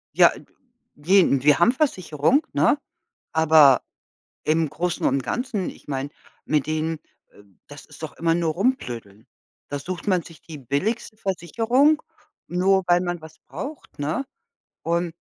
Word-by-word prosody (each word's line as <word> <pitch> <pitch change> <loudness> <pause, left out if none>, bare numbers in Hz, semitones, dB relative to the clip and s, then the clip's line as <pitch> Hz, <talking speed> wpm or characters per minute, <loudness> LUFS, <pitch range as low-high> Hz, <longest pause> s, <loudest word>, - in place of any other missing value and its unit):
Ja, - - +7 0.6
gehen 165 -3 +3
wir 150 0 +5
haben 195 +7 +5
Versicherung, 255 - +1
ne? - - +3 0.6
Aber 155 -5 +6 0.6
im 160 +1 +2
Großen 175 +3 -2
und 135 +1 +2
Ganzen, 240 -7 -2
ich - - -15
meine, 135 0 -3 0.4
mit 150 -3 +1
denen, 155 +1 -1 0.3
äh, 105 - -18 0.2
das - - -12
ist - - -15
doch - - -5
immer 165 0 +2
nur 165 -2 0
rumblödeln. 120 - -3 0.4
Da 145 - -3
sucht 175 +6 -6
man 185 -4 +2
sich 165 -1 -15
die 160 -3 -10
billigste 190 - -2
Versicherung, 230 - +1 0.5
nur 190 +2 +2
weil 175 0 +4
man 175 -2 -3
was 155 0 -13
braucht, 285 - -8
ne? 155 - -2 0.6
Und 170 0 -1
170 Hz, 140 wpm, -23 LUFS, 150-195 Hz, 0.6 s, Ja